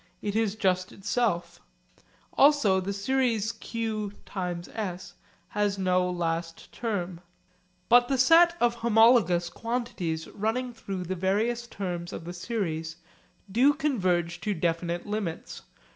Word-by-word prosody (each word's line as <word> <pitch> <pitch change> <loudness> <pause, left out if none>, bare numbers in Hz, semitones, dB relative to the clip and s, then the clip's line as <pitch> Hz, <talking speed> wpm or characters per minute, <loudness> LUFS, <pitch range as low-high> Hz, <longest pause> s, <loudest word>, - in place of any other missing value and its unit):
It 205 0 -3
is 220 -2 +1
just 185 -3 0
itself. 205 -3 -1 0.7
Also 275 -10 +5
the 190 +2 -3
series 225 +1 0
q(s) 200 -4 -5 0.4
has 205 -1 0
no 185 -1 +2
last 165 -1 -3
term. 185 -7 -3 0.7
But 245 +1 +6
the 270 - +1
sets 335 +6 +6
of 240 -1 +3
homologous 225 -6 +4
quantities 230 -9 -3
running 240 +4 -2
through 195 -5 -5
the 180 +2 -3
various 220 +6 0
terms 175 -5 -5
of 165 - -7
the 175 - -6
series 170 -5 -3 0.6
do 265 +7 +4
converge 180 - 0
to 210 -2 -1
definite 170 +1 -1
limits. 205 -6 -4
200 Hz, 115 wpm, -27 LUFS, 175-235 Hz, 0.7 s, But